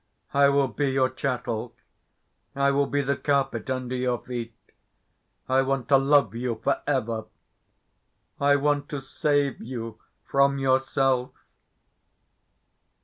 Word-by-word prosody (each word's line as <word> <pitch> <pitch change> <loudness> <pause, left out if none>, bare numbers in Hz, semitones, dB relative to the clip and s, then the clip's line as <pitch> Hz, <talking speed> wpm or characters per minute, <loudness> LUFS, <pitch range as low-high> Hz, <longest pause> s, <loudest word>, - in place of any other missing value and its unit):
I 140 0 +5
will 140 -1 +3
be 135 +4 -1
your 130 -1 +1
chattel. 125 -3 -3 0.8
I 140 0 +3
will 140 0 +1
be 145 0 0
the 140 +1 0
carpet 135 -4 -1
under 130 -1 -2
your 125 -1 0
feet. 120 -2 -6 0.9
I 130 +1 +3
want 135 -1 -1
to 140 - +7
love 135 -6 +3
you 120 -1 -3
for - - +1
ever. 115 -6 -1 1.1
I 145 0 +4
want 145 0 0
to 145 -3 -4
save 140 0 0
you 115 -2 -6 0.3
from 140 0 +2
yourself. 130 -1 +1
135 Hz, 125 wpm, -25 LUFS, 125-140 Hz, 1.1 s, to